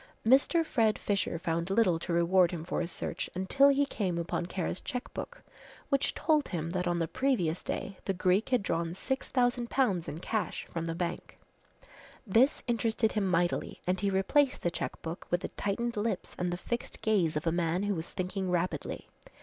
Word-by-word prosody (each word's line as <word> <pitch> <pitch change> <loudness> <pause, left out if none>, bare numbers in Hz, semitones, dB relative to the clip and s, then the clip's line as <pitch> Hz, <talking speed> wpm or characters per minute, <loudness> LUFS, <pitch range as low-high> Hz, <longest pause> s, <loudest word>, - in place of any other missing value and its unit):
Mr. 275 +7 +5
Fred 225 -7 +2
Fisher 200 -4 -1
found 170 +1 -2
little 195 -5 +3
to 175 - -5
reward 170 +1 +4
him 170 -3 -5
for 170 - -2
his 170 - -3
search - - -4
until 190 +10 +4
he 280 +1 +3
came 190 -10 -2
upon 170 +1 -2
Kara's 180 0 -3
cheque 250 -1 -5
book - - -7 0.5
which 275 0 +1
told 305 -2 +2
him 165 -1 -3
that 180 0 -1
on 175 0 +1
the 165 -1 0
previous 205 -12 0
day 195 -1 -4
the 195 - 0
Greek 185 +5 +2
had 250 -5 +2
drawn 170 -2 -1
6,000 245 0 0
pounds 195 -11 +1
in 155 - -5
cash 215 +4 -2
from 165 -1 -2
the 165 0 -3
bank. 175 0 -4 0.9
This 235 +7 +3
interested 225 -2 +1
him 210 -3 0
mightily 175 -1 0
and 180 +1 +1
he 200 - +2
replaced 250 +9 +2
the 175 - +1
cheque - - -4
book 165 +1 -6
with 175 0 +1
the - - -4
tightened 235 +4 -2
lips 210 -2 -2
and 180 0 0
the 175 - -2
fixed 235 +6 -4
gaze 190 -8 +2
of 150 - -2
a 165 - +2
man 170 +2 0
who 205 0 +1
was 165 -2 -4
thinking 185 +1 -3
rapidly. 180 0 -2
190 Hz, 190 wpm, -30 LUFS, 170-235 Hz, 0.9 s, Mr